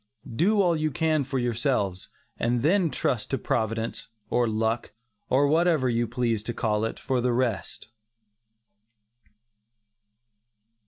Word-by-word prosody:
Do 200 - +3
all 175 -2 +3
you 155 0 0
can 155 0 +1
for 135 +1 -3
yourselves, 120 -6 -1 0.3
and 120 0 +1
then 175 +4 +3
trust 125 -6 -1
to 135 - 0
Providence, 115 -1 -2 0.2
or 120 -1 +2
luck, 110 +1 -1 0.4
or 135 +3 +4
whatever 155 -3 +3
you 120 0 0
please 115 -2 -1
to 120 +2 -5
call 105 -1 0
it, 115 - -4
for 130 -2 -1
the 125 0 +1
rest. 120 -4 -2
125 Hz, 125 wpm, -26 LUFS, 115-145 Hz, 0.4 s, or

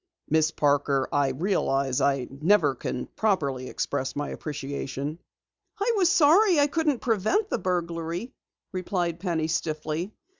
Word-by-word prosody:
Miss 160 0 +3
Parker, 140 -3 +1
I 145 -1 +3
realize 135 -4 0
I 135 -3 +1
never 150 +1 +3
can 125 0 -4
properly 140 -12 0
express 130 - -2
my 145 0 -3
appreciation." 145 +1 -5 0.6
"I 445 +4 +2
was 370 -4 +3
sorry 360 +1 +5
I 285 - +6
couldn't 295 -3 0
prevent 245 - +1
the - - 0
burglary," 175 +3 -3 0.4
replied 180 -2 -2
Penny 170 -4 -1
stiffly. 160 +2 -2
165 Hz, 125 wpm, -26 LUFS, 140-215 Hz, 0.6 s, I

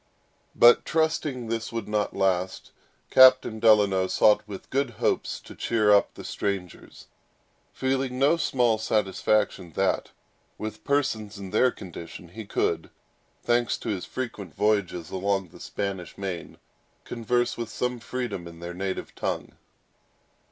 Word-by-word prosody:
But 120 0 +7
trusting 155 -6 0
this 115 0 -3
would 115 -3 -4
not 105 -1 -1
long 100 - -4
last, 95 0 0 0.4
Captain 130 -4 +7
Delano 105 -4 +4
sought, 105 +2 +4
with 100 -2 -9
good 135 0 +1
hopes, - - 0
to - - -12
cheer 110 -3 +2
up 100 - +3
the - - -9
strangers, 95 -4 -5 0.7
feeling 130 -1 -1
no 140 +5 +4
small 120 -8 +1
satisfaction 105 -4 0
that, - - 0 0.5
with 110 0 -6
persons 110 -8 -1
in 95 -2 -8
their 130 - +4
condition, 85 -4 -9
he 110 +5 -8
could—thanks 120 +3 -2
to - - -6
his 95 -4 -2
frequent 105 - -6
voyages 100 -6 0
along 95 -1 -1
the - - -15
Spanish 95 -4 -5
main—converse 115 +6 -4
with 115 -2 -5
some 125 +1 -2
freedom 115 -6 -4
in 85 -1 -11
their 85 +1 -6
native 95 +1 -4
tongue. - - -3
105 Hz, 130 wpm, -26 LUFS, 95-120 Hz, 0.7 s, But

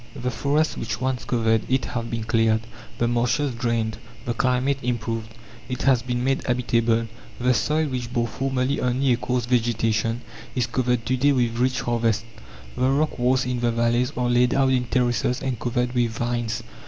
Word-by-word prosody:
The 125 +1 -2
forests 150 +4 0
which 110 +1 -3
once 130 -1 -2
covered 115 -2 +2
it 130 0 +1
have 115 -1 -4
been 115 -1 -3
cleared, 110 -1 +2 0.4
the 120 - +1
marshes 125 +4 +1
drained, 115 -2 -1 0.3
the 120 - -1
climate 130 +3 +1
improved. 115 -2 -2 0.4
It 125 - -3
has 130 -3 +4
been 125 0 -2
made 135 +1 +1
habitable. 115 -2 +1 0.3
The 125 +1 +3
soil, 155 +6 +1
which 125 -4 -4
bore 120 -1 +1
formerly 135 +2 -1
only 125 +1 +2
a - - +1
coarse 125 0 -1
vegetation, 115 -1 +1 0.3
is 125 -2 +2
covered 125 -1 0
to 130 +2 +1
day 140 +3 +4
with 120 -3 0
rich 130 +1 +1
harvests. 115 -2 0 0.5
The 130 - +2
rock 145 +1 +1
walls 125 +1 +2
in 125 -1 -1
the 120 0 +1
valleys 120 +2 +1
are 125 -1 +1
laid 120 0 +3
out 135 -1 +3
in 125 -1 +2
terraces 125 0 +1
and 130 -4 -3
covered 125 0 -1
with 120 -2 +2
vines. 120 0 -2
120 Hz, 180 wpm, -24 LUFS, 115-130 Hz, 0.5 s, has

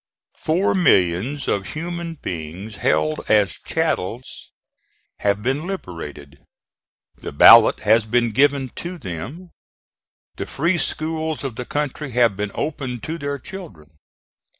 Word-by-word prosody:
Four 170 +5 +1
millions 130 - +2
of 100 -1 -1
human 170 +1 -4
beings 95 - -6
held 75 0 +1
as 105 -2 +3
chattels 130 - -3 0.7
have 100 0 0
been 135 +7 -1
liberated; 75 - -7 0.8
the - - -7
ballot - - +8
has 110 +1 +3
been 120 +1 +2
given 140 +2 +2
to 175 +1 -5
them; 135 - -7 0.9
the - - -4
free 170 +4 0
schools 160 -1 -2
of 135 -5 -4
the 125 - -5
country 145 -1 -3
have 120 -4 +3
been 105 +1 -3
opened 130 -6 -4
to 165 +1 -4
their 145 -1 -3
children. 120 - -10
130 Hz, 125 wpm, -21 LUFS, 100-155 Hz, 0.9 s, ballot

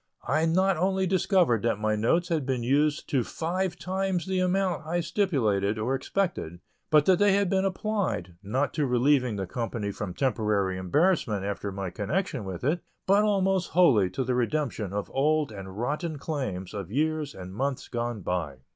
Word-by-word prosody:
I 155 +2 +2
not 185 +2 +2
only 190 +2 +1
discovered 180 - +2
that 115 -2 +1
my 110 0 0
notes 165 - +1
had 160 -4 0
been 130 -2 -1
used 145 +4 +1
to 130 -4 +2
five 175 +7 -2
times 185 -1 -1
the 190 -1 -1
amount 185 -2 +1
I 175 +2 0
stipulated 115 - +1
or 115 +5 -1
expected, 135 - -2 0.3
but 150 -1 +5
that 185 -2 +4
they 205 -1 +5
had 200 -2 +2
been 190 0 +2
applied, 195 - -2
not 125 +8 -1
to 150 -3 0
relieving 125 -1 +2
the 95 -1 -3
company 115 0 -3
from 100 -3 -5
temporary 105 -7 0
embarrassment 110 - +1
after 100 0 -3
my 95 -2 -4
connection 125 - -2
with 95 -2 -6
it, 155 +7 +1 0.3
but 200 +2 +4
almost 195 -3 +1
wholly 135 - +5
to 95 +9 -2
the 130 0 -1
redemption 125 -5 -1
of 100 0 -4
old 150 0 +2
and 95 -2 -8
rotten 150 +7 -2
claims 130 - -4
of 100 -2 -6
years 155 +2 -1
and 95 0 -8
months 135 +4 -2
gone 120 -3 -3
by. 85 -7 -3
140 Hz, 175 wpm, -27 LUFS, -, 0.3 s, but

